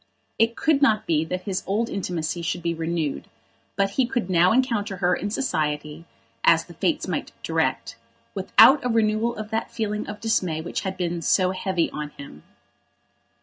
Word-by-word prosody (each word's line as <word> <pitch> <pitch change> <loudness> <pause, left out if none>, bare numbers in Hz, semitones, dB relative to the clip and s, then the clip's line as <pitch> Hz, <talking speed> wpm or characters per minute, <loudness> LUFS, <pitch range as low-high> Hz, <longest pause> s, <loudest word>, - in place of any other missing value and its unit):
It 230 +1 +3
could 310 0 +2
not 220 -6 +3
be 155 -2 +1
that 180 +3 -4
his 190 -1 -2
old 215 +4 0
intimacy 175 -5 -3
should 170 +1 -3
be 170 0 0
renewed, 165 -2 -3 0.5
but 195 0 +1
he 260 -3 +3
could 240 -7 -2
now 180 +1 +5
encounter 225 -5 0
her 180 -1 +2
in 205 - -3
society, 155 - -2 0.4
as - - +4
the - - -13
Fates - - -1
might - - -3
direct, 115 - -1 0.4
without 260 +8 +6
a 250 - 0
renewal 225 0 +1
of 215 0 -7
that 225 +1 -2
feeling 210 -2 -3
of 210 0 -7
dismay 185 -8 0
which 160 - -4
had 190 -1 -4
been 175 -1 -2
so 185 +3 +2
heavy 185 -2 -1
on 150 -1 -5
him. 140 - -11
190 Hz, 175 wpm, -24 LUFS, 170-220 Hz, 0.5 s, without